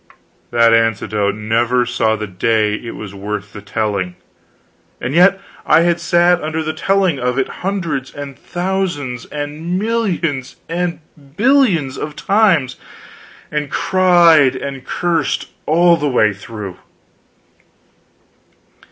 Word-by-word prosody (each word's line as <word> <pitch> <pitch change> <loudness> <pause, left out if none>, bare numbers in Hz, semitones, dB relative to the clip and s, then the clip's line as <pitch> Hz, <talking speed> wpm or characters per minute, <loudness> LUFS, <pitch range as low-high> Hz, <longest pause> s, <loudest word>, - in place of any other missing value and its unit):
That 115 -1 +4
anecdote 110 -3 +1
never 115 +3 +1
saw 115 -2 +1
the 110 - -4
day 105 +2 0
that 115 - -8
it - - -4
was 105 -2 -8
worth 105 +1 -5
the 105 - -8
telling; 100 -3 -2 0.8
and 125 +3 -3
yet 180 +4 +5 0.2
I - - +4
had 170 0 +2
sat 175 +1 +3
under 155 +1 -2
the 155 0 -3
telling 190 -3 +1
of 125 +1 -1
it 135 - +1
hundreds 170 -9 -2
and 140 -1 -8
thousands 175 -10 -3
and 150 +4 -4
millions 185 - -1
and 170 0 -2 0.4
billions 215 - +2
of 150 0 -5
times, 185 - +2 0.7
and 150 -1 -2
cried 170 -7 +4
and 135 -2 -6
cursed 165 +1 -1 0.2
all 170 +2 +5
the 150 -2 -1
way 110 -5 +3
through. 100 -2 -8
145 Hz, 125 wpm, -17 LUFS, 115-175 Hz, 0.8 s, yet